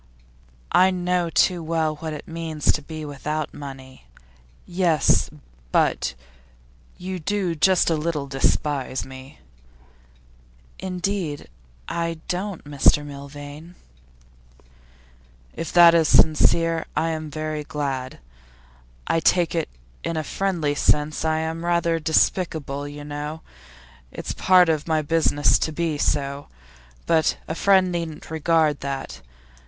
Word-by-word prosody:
'I 185 Hz, +1 st, +5 dB
know 180 Hz, -1 st, 0 dB
too 175 Hz, +1 st, +2 dB
well 160 Hz, -1 st, -1 dB
what 160 Hz, +1 st, -5 dB
it 150 Hz, -, -8 dB
means 165 Hz, -2 st, -1 dB
to 150 Hz, -, -2 dB
be 155 Hz, +1 st, -7 dB
without 150 Hz, +1 st, -4 dB
money.' 135 Hz, -, -10 dB, 0.6 s
'Yes, 175 Hz, -5 st, +2 dB, 0.4 s
but -, -, +1 dB, 0.8 s
you 185 Hz, 0 st, -5 dB
do 190 Hz, +1 st, -1 dB
just 180 Hz, +3 st, +3 dB
a -, -, +3 dB
little 155 Hz, -2 st, -2 dB
despise 135 Hz, 0 st, -1 dB
me?' 130 Hz, +2 st, -12 dB, 1.4 s
'Indeed, 180 Hz, -4 st, -3 dB, 0.4 s
I 165 Hz, -1 st, -2 dB
don't, 185 Hz, 0 st, -3 dB
Mr 145 Hz, 0 st, +3 dB
Milvain.' 145 Hz, +4 st, -10 dB, 1.8 s
'If 165 Hz, -, -5 dB
that 170 Hz, -1 st, +8 dB
is 165 Hz, -2 st, +4 dB
sincere, 165 Hz, +2 st, +4 dB
I'm 160 Hz, -1 st, -1 dB
very 155 Hz, 0 st, -4 dB
glad. 135 Hz, -3 st, -4 dB, 0.9 s
I 165 Hz, -, +1 dB
take 175 Hz, 0 st, +2 dB
it 165 Hz, -2 st, -1 dB, 0.3 s
in 165 Hz, -1 st, -2 dB
a 155 Hz, -, -1 dB
friendly 170 Hz, -4 st, -1 dB
sense. 150 Hz, +1 st, +1 dB
I 160 Hz, 0 st, +1 dB
am 160 Hz, +1 st, -4 dB
rather 170 Hz, -1 st, +1 dB
despicable, 155 Hz, -3 st, 0 dB
you 145 Hz, 0 st, -8 dB
know; 150 Hz, +2 st, -5 dB, 0.7 s
it's -, -, -5 dB
part 185 Hz, -1 st, +5 dB
of 155 Hz, -1 st, 0 dB
my 155 Hz, -1 st, +1 dB
business 150 Hz, -1 st, +2 dB
to 160 Hz, -, -1 dB
be 155 Hz, -1 st, -2 dB
so. 140 Hz, -1 st, -1 dB, 0.6 s
But 160 Hz, -2 st, +2 dB
a -, -, -2 dB
friend 190 Hz, +1 st, +3 dB
needn't 165 Hz, -3 st, -5 dB
regard 160 Hz, -2 st, +2 dB
that. 135 Hz, -, -5 dB
160 Hz, 120 wpm, -23 LUFS, 145-170 Hz, 1.8 s, that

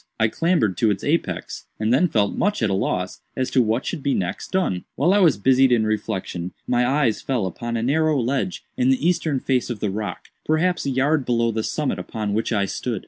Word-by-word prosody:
I 110 Hz, 0 st, +3 dB
clambered 125 Hz, -, +1 dB
to 115 Hz, -, +3 dB
its 100 Hz, -2 st, -1 dB
apex, 160 Hz, +4 st, -2 dB
and 110 Hz, +2 st, +1 dB
then 155 Hz, +8 st, +4 dB
felt 105 Hz, -, +1 dB
much 205 Hz, -, 0 dB
at 105 Hz, -, +2 dB
a -, -, +1 dB
loss 90 Hz, -1 st, -2 dB, 0.2 s
as 130 Hz, 0 st, -1 dB
to 130 Hz, -, +4 dB
what 115 Hz, +2 st, 0 dB
should -, -, -3 dB
be 140 Hz, 0 st, 0 dB
next 90 Hz, -2 st, -3 dB
done. 180 Hz, -, 0 dB
"While 165 Hz, +8 st, +3 dB
I 205 Hz, -, +4 dB
was 165 Hz, -, +4 dB
busied 130 Hz, +4 st, +4 dB
in 115 Hz, -3 st, +3 dB
reflection, 95 Hz, -5 st, -3 dB
my 120 Hz, 0 st, +2 dB
eyes 135 Hz, -5 st, +1 dB
fell 125 Hz, -7 st, -1 dB
upon 115 Hz, +5 st, -4 dB
a 115 Hz, -, -2 dB
narrow 155 Hz, +3 st, +2 dB
ledge 135 Hz, +9 st, -1 dB
in 255 Hz, 0 st, +2 dB
the 260 Hz, -9 st, +2 dB
eastern 160 Hz, -5 st, +1 dB
face 125 Hz, -1 st, 0 dB
of 120 Hz, -4 st, -4 dB
the 105 Hz, -1 st, -1 dB
rock, 105 Hz, +1 st, -5 dB
perhaps 165 Hz, +1 st, +1 dB
a -, -, +1 dB
yard 140 Hz, +3 st, +1 dB
below 115 Hz, -2 st, +1 dB
the 110 Hz, 0 st, -1 dB
summit 150 Hz, +5 st, -2 dB
upon 105 Hz, -2 st, -4 dB
which 110 Hz, +3 st, -1 dB
I 100 Hz, -3 st, +1 dB
stood. 115 Hz, +2 st, -3 dB
125 Hz, 225 wpm, -22 LUFS, 110-150 Hz, 0.2 s, then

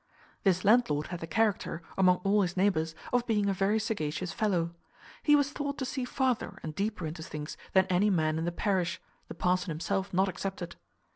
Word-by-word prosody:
This 185 Hz, -1 st, +2 dB
landlord 195 Hz, -10 st, +3 dB
had 175 Hz, -2 st, -4 dB
the 165 Hz, -, -6 dB
character, 205 Hz, -4 st, 0 dB
among 180 Hz, -1 st, +4 dB
all 205 Hz, +1 st, +3 dB
his 180 Hz, -1 st, -1 dB
neighbours, 165 Hz, -5 st, +1 dB, 0.2 s
of 245 Hz, -1 st, +2 dB
being 210 Hz, -3 st, +2 dB
a 200 Hz, -, +2 dB
very 195 Hz, +3 st, +2 dB
sagacious 185 Hz, -5 st, -2 dB
fellow. 180 Hz, -7 st, 0 dB, 0.5 s
He 295 Hz, -, +5 dB
was 285 Hz, -1 st, +2 dB
thought 285 Hz, -1 st, -3 dB
to 265 Hz, -, -2 dB
see 260 Hz, -1 st, -3 dB
farther 255 Hz, -2 st, -1 dB
and 155 Hz, -, -4 dB
deeper 200 Hz, 0 st, -2 dB
into 160 Hz, +1 st, -5 dB
things 150 Hz, -1 st, -6 dB, 0.2 s
than 190 Hz, -1 st, +5 dB
any 185 Hz, +3 st, +2 dB
man 160 Hz, -4 st, +1 dB
in 165 Hz, -, -2 dB
the 175 Hz, -, 0 dB
parish, 175 Hz, -1 st, 0 dB, 0.3 s
the -, -, -8 dB
parson 180 Hz, +2 st, +1 dB
himself 190 Hz, +5 st, -2 dB
not 190 Hz, +2 st, +3 dB
excepted. 190 Hz, -2 st, -4 dB
190 Hz, 195 wpm, -30 LUFS, 170-210 Hz, 0.5 s, He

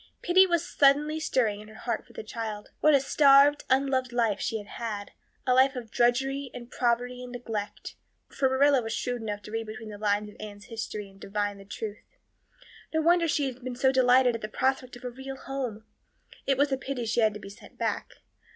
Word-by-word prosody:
Pity 375 Hz, +2 st, +6 dB
was 345 Hz, -1 st, 0 dB
suddenly 295 Hz, +2 st, +3 dB
stirring 225 Hz, -9 st, 0 dB
in 210 Hz, -, -12 dB
her 215 Hz, -, -14 dB
heart 235 Hz, -, -3 dB
for -, -, -18 dB
the -, -, -7 dB
child. 215 Hz, -1 st, -6 dB
What 305 Hz, -1 st, +5 dB
a -, -, +6 dB
starved, 280 Hz, +1 st, +5 dB
unloved 260 Hz, -1 st, +2 dB
life 230 Hz, -4 st, +1 dB
she 225 Hz, -, -1 dB
had 205 Hz, -, -8 dB, 0.2 s
had 210 Hz, -3 st, -4 dB, 0.3 s
a 255 Hz, -, +3 dB
life 265 Hz, +2 st, +4 dB
of 235 Hz, -3 st, -7 dB
drudgery 270 Hz, +3 st, +1 dB
and 245 Hz, -1 st, -9 dB
poverty 245 Hz, +1 st, 0 dB
and 250 Hz, -, -8 dB
neglect; 225 Hz, -4 st, -5 dB, 0.3 s
for 265 Hz, -, 0 dB
Marilla 275 Hz, 0 st, +4 dB
was 225 Hz, -1 st, -4 dB
shrewd 245 Hz, +1 st, -2 dB
enough 205 Hz, -2 st, -4 dB
to 210 Hz, -, -10 dB
read 225 Hz, 0 st, -3 dB
between 220 Hz, +1 st, -8 dB
the 205 Hz, -1 st, -9 dB
lines 210 Hz, 0 st, +1 dB
of 210 Hz, -, -15 dB
Anne's 205 Hz, -1 st, -9 dB
history 220 Hz, -3 st, -5 dB
and 195 Hz, 0 st, -18 dB
divine 205 Hz, 0 st, -2 dB
the 195 Hz, -, -12 dB
truth. 210 Hz, +1 st, -6 dB, 0.9 s
No 320 Hz, -, +1 dB
wonder 340 Hz, +1 st, +4 dB
she 295 Hz, -2 st, +1 dB
had 255 Hz, -1 st, -6 dB
been 255 Hz, -1 st, -4 dB
so 265 Hz, +1 st, +3 dB
delighted 255 Hz, -1 st, +5 dB
at 230 Hz, -, -5 dB
the 215 Hz, -, -3 dB
prospect 260 Hz, +2 st, -1 dB
of 245 Hz, -, -13 dB
a 250 Hz, -, -3 dB
real 265 Hz, +2 st, -8 dB
home. 250 Hz, -6 st, -5 dB, 0.6 s
It 270 Hz, -1 st, +3 dB
was 285 Hz, +1 st, +2 dB
a 270 Hz, -, +1 dB
pity 265 Hz, -3 st, -4 dB
she 225 Hz, +2 st, 0 dB
had 215 Hz, -2 st, +3 dB
to -, -, -6 dB
be 195 Hz, -, -10 dB
sent 200 Hz, -, -15 dB
back. -, -, -3 dB
245 Hz, 215 wpm, -28 LUFS, 215-270 Hz, 0.9 s, Pity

